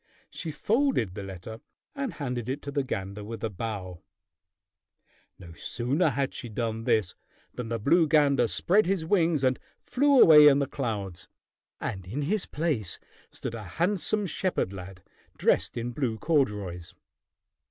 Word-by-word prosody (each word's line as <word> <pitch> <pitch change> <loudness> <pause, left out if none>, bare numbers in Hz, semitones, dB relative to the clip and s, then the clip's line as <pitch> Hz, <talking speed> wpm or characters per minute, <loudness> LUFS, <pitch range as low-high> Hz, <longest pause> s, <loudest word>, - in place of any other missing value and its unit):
She 165 - -5
folded 220 - +1
the 100 - -6
letter 100 +3 -8 0.3
and 275 -5 -3
handed 125 -5 -4
it 135 +3 -3
to 140 - -5
the 140 - 0
gander 100 -5 -5
with 115 +2 -7
a 110 - -1
bow. 95 -4 -5 1.4
No 85 -3 -12
sooner 135 - 0
had 135 0 -1
she 120 - -6
done 115 0 -3
this 110 -7 +1 0.4
than 120 -2 -6
the 115 - -1
blue 160 +9 +3
gander 145 -5 +4
spread 195 - +2
his 185 -4 0
wings 165 -5 +2
and 130 0 +2 0.2
flew 280 +1 +3
away 150 -5 +9
in 140 -1 +6
the 140 - +1
clouds, 105 - -4 0.5
and 95 -2 -5
in 135 +10 -3
his 200 +7 0
place 145 - -1 0.3
stood - - -6
a 115 -2 -6
handsome 200 +4 +2
shepherd 180 - -1
lad 95 -1 -9 0.3
dressed - - +1
in 120 +1 -3
blue 120 -3 -2
corduroys. 105 - -1
125 Hz, 155 wpm, -27 LUFS, 105-160 Hz, 1.4 s, away